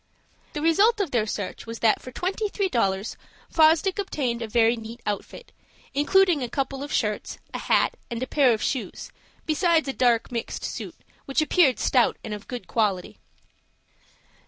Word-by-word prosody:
The 300 Hz, -2 st, -4 dB
result 405 Hz, +8 st, +4 dB
of 380 Hz, -8 st, -1 dB
their 220 Hz, -3 st, +1 dB
search 205 Hz, +1 st, -5 dB
was 230 Hz, 0 st, -5 dB
that 220 Hz, -1 st, +2 dB
for 255 Hz, -, -9 dB
twenty 385 Hz, -, -2 dB
three 395 Hz, -1 st, -1 dB
dollars 195 Hz, -, 0 dB, 0.3 s
Fosdick 325 Hz, +4 st, +4 dB
obtained 260 Hz, -11 st, -2 dB
a 230 Hz, -, -3 dB
very 230 Hz, +1 st, +3 dB
neat 225 Hz, +1 st, -9 dB
outfit, 205 Hz, -1 st, -5 dB, 0.4 s
including 345 Hz, +2 st, +3 dB
a 245 Hz, -, -3 dB
couple 270 Hz, +1 st, -3 dB
of 285 Hz, -, -6 dB
shirts, 210 Hz, -2 st, -1 dB, 0.2 s
a -, -, -3 dB
hat, -, -, +2 dB
and 235 Hz, 0 st, -3 dB
a -, -, 0 dB
pair 270 Hz, -2 st, +3 dB
of 220 Hz, -, 0 dB
shoes, 260 Hz, -, -3 dB, 0.3 s
besides 320 Hz, 0 st, +2 dB
a 270 Hz, -, -1 dB
dark 240 Hz, -3 st, +2 dB
mixed 235 Hz, -1 st, -4 dB
suit, -, -, -5 dB, 0.3 s
which 275 Hz, -, 0 dB
appeared 310 Hz, -, +4 dB
stout 250 Hz, -3 st, +2 dB
and 220 Hz, -, -5 dB
of 210 Hz, 0 st, -8 dB
good 245 Hz, -2 st, -6 dB
quality. 200 Hz, -5 st, -1 dB
255 Hz, 170 wpm, -25 LUFS, 230-320 Hz, 0.4 s, result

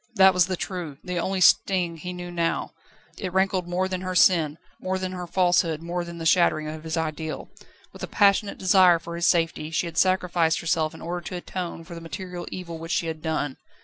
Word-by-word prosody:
That 190 Hz, -2 st, +7 dB
was 180 Hz, -1 st, +3 dB
the 185 Hz, -1 st, -2 dB
true, 170 Hz, -8 st, -5 dB
the 180 Hz, -1 st, -3 dB
only 190 Hz, +2 st, -1 dB
sting 180 Hz, -1 st, +4 dB
which 165 Hz, -, -12 dB
he 180 Hz, -, -5 dB
knew 175 Hz, 0 st, -7 dB
now; 170 Hz, -1 st, -1 dB, 0.5 s
it 185 Hz, -3 st, -3 dB
rankled 190 Hz, -1 st, +1 dB
more 180 Hz, +2 st, 0 dB
than 185 Hz, -1 st, -3 dB
her 185 Hz, 0 st, -4 dB
sin, 160 Hz, -5 st, +4 dB, 0.2 s
more 190 Hz, 0 st, -2 dB
than 185 Hz, 0 st, -3 dB
her 180 Hz, -1 st, -6 dB
falsehood, 170 Hz, -3 st, +2 dB
more 175 Hz, +1 st, -2 dB
than 170 Hz, 0 st, -8 dB
the 165 Hz, -, -6 dB
shattering 155 Hz, -2 st, +3 dB
of 155 Hz, 0 st, -7 dB
his 160 Hz, 0 st, -3 dB
ideal. 160 Hz, 0 st, -4 dB, 0.4 s
With -, -, -12 dB
a -, -, -3 dB
passionate 200 Hz, 0 st, +3 dB
desire 185 Hz, -2 st, +5 dB
for 170 Hz, +1 st, -8 dB
his 170 Hz, 0 st, +1 dB
safety, 165 Hz, -2 st, +1 dB
she 165 Hz, +2 st, -1 dB
had 165 Hz, 0 st, -2 dB
sacrificed 175 Hz, -3 st, +2 dB
herself 160 Hz, -1 st, 0 dB
in -, -, -11 dB
order 175 Hz, +1 st, -3 dB
to 185 Hz, -, -5 dB
atone 175 Hz, -1 st, -5 dB
for 170 Hz, +1 st, -11 dB
the 165 Hz, -, -8 dB
material 180 Hz, +1 st, -7 dB
evil 170 Hz, -3 st, -7 dB
which 165 Hz, +3 st, -4 dB
she 180 Hz, -, 0 dB
had 160 Hz, -1 st, -4 dB
done. 155 Hz, -4 st, -2 dB
175 Hz, 220 wpm, -25 LUFS, 165-185 Hz, 0.5 s, That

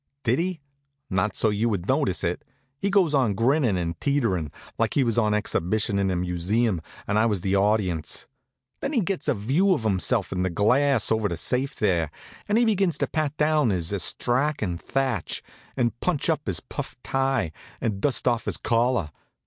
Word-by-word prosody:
Did 125 Hz, +4 st, +2 dB
he? 180 Hz, -1 st, -2 dB, 0.5 s
Not 95 Hz, +2 st, 0 dB
so 110 Hz, -, +2 dB
you 110 Hz, +3 st, +1 dB
would 95 Hz, -5 st, -2 dB
notice -, -, +1 dB
it. -, -, -1 dB, 0.4 s
He 200 Hz, -, 0 dB
goes 190 Hz, -6 st, +3 dB
on 125 Hz, -8 st, +2 dB
grinnin' 120 Hz, -1 st, +2 dB
and 85 Hz, -2 st, -3 dB
teeterin', 105 Hz, -, 0 dB, 0.3 s
like -, -, +1 dB
he 140 Hz, -, +4 dB
was 115 Hz, -2 st, +1 dB
on 105 Hz, -2 st, +2 dB
exhibition 105 Hz, -1 st, 0 dB
in 95 Hz, -1 st, +1 dB
a 95 Hz, -, 0 dB
museum 90 Hz, +3 st, 0 dB, 0.3 s
and 105 Hz, +1 st, +2 dB
I 115 Hz, -, +4 dB
was 105 Hz, -5 st, -1 dB
the 95 Hz, +1 st, 0 dB
audience. 100 Hz, -5 st, +1 dB, 0.5 s
Then 275 Hz, +2 st, -3 dB
he 245 Hz, -, +3 dB
gets 195 Hz, -1 st, -2 dB
a -, -, +2 dB
view 150 Hz, -, +2 dB
of 115 Hz, -, -4 dB
himself 100 Hz, 0 st, +1 dB
in 90 Hz, -, -1 dB
the 95 Hz, -, +1 dB
glass 130 Hz, +11 st, +2 dB
over 110 Hz, -2 st, +2 dB
the 85 Hz, -, -3 dB
safe 130 Hz, -, -1 dB
there, 85 Hz, -7 st, +1 dB, 0.4 s
and 205 Hz, -, +2 dB
begins 195 Hz, -6 st, +2 dB
to -, -, +1 dB
pat 155 Hz, -1 st, -2 dB
down 150 Hz, -4 st, +3 dB
his 90 Hz, -2 st, -1 dB
astrakhan 120 Hz, -, 0 dB
thatch, 135 Hz, +1 st, -2 dB, 0.3 s
and 120 Hz, -2 st, 0 dB
punch 175 Hz, -6 st, 0 dB
up -, -, -3 dB
his -, -, -1 dB
puff -, -, -6 dB
tie, 135 Hz, -10 st, 0 dB, 0.3 s
and 100 Hz, -4 st, -2 dB
dust 140 Hz, -2 st, 0 dB
off 120 Hz, -2 st, +1 dB
his -, -, -1 dB
collar. 120 Hz, -8 st, +1 dB
115 Hz, 185 wpm, -25 LUFS, 95-140 Hz, 0.5 s, he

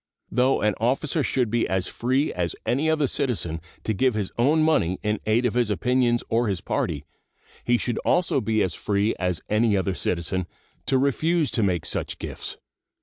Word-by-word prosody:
Though 130 Hz, +2 st, +2 dB
an 105 Hz, 0 st, +3 dB
officer 135 Hz, +7 st, +1 dB
should 125 Hz, -5 st, 0 dB
be 120 Hz, 0 st, +1 dB
as 95 Hz, -1 st, 0 dB
free 130 Hz, +9 st, 0 dB
as 85 Hz, -1 st, -2 dB
any 145 Hz, +6 st, +1 dB
other 155 Hz, -2 st, +2 dB
citizen 100 Hz, -, -2 dB, 0.2 s
to 110 Hz, -, 0 dB
give 125 Hz, +3 st, +2 dB
his 105 Hz, -3 st, -2 dB
own 150 Hz, +6 st, +3 dB
money 95 Hz, -, +2 dB
in 105 Hz, 0 st, 0 dB
aid 115 Hz, +3 st, +3 dB
of 120 Hz, -, +1 dB
his 120 Hz, -2 st, +1 dB
opinions 120 Hz, +3 st, +1 dB
or 115 Hz, +1 st, +1 dB
his 95 Hz, -4 st, -1 dB
party, 70 Hz, -3 st, -2 dB, 0.6 s
he 120 Hz, 0 st, +3 dB
should 120 Hz, -1 st, -2 dB
also 175 Hz, -6 st, +2 dB
be 110 Hz, -2 st, +1 dB
as 90 Hz, -, -1 dB
free 105 Hz, +1 st, 0 dB
as 90 Hz, -3 st, -1 dB
any 105 Hz, -1 st, +2 dB
other 95 Hz, 0 st, 0 dB
citizen 90 Hz, +1 st, -2 dB, 0.4 s
to 135 Hz, -, +3 dB
refuse 155 Hz, +4 st, +1 dB
to 115 Hz, -, 0 dB
make 90 Hz, -5 st, 0 dB
such -, -, -2 dB
gifts. -, -, -5 dB
115 Hz, 185 wpm, -25 LUFS, 95-130 Hz, 0.6 s, an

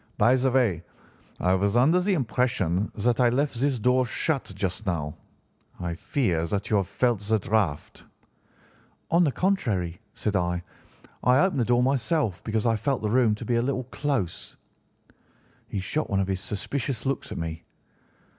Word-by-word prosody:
'By 120 Hz, -, +5 dB
the 130 Hz, 0 st, +2 dB
way, 120 Hz, -10 st, +2 dB, 0.6 s
I 90 Hz, +1 st, +2 dB
was 100 Hz, +4 st, +2 dB
under 155 Hz, +9 st, +5 dB
the 190 Hz, +1 st, +1 dB
impression 115 Hz, -, 0 dB
that 115 Hz, +3 st, +1 dB
I 125 Hz, -1 st, +5 dB
left 130 Hz, 0 st, 0 dB
this 140 Hz, -2 st, +2 dB
door 125 Hz, +3 st, +3 dB
shut 135 Hz, -1 st, -1 dB
just 95 Hz, +1 st, -3 dB
now. 75 Hz, -5 st, -2 dB, 0.6 s
I 85 Hz, -1 st, -3 dB
fear 85 Hz, -, -1 dB
that 100 Hz, +5 st, -3 dB
you 105 Hz, -, +4 dB
have 100 Hz, -2 st, 0 dB
felt 120 Hz, -4 st, +1 dB
the 105 Hz, +2 st, +1 dB
draught.' 100 Hz, -7 st, -1 dB, 1.1 s
"'On 170 Hz, +2 st, +5 dB
the 150 Hz, -, +2 dB
contrary,' 105 Hz, -, -1 dB
said 105 Hz, -1 st, -2 dB
I, 90 Hz, -1 st, 0 dB, 0.6 s
'I 125 Hz, +1 st, +5 dB
opened 185 Hz, -7 st, +2 dB
the 120 Hz, -, +2 dB
door 120 Hz, +1 st, +3 dB
myself 130 Hz, -, 0 dB
because 110 Hz, 0 st, -1 dB
I 115 Hz, -1 st, +3 dB
felt 135 Hz, +1 st, -1 dB
the 105 Hz, -, 0 dB
room 120 Hz, -3 st, +3 dB
to -, -, -8 dB
be 120 Hz, -1 st, +1 dB
a -, -, +2 dB
little 130 Hz, +1 st, -1 dB
close.' 135 Hz, -, -3 dB, 1.1 s
"He 100 Hz, -, -3 dB
shot 150 Hz, +11 st, -2 dB
one 100 Hz, -, +1 dB
of 95 Hz, -, 0 dB
his 95 Hz, -1 st, -1 dB
suspicious 125 Hz, +8 st, -3 dB
looks 140 Hz, +1 st, -2 dB
at -, -, -5 dB
me. 80 Hz, 0 st, -4 dB
115 Hz, 175 wpm, -26 LUFS, 95-130 Hz, 1.1 s, By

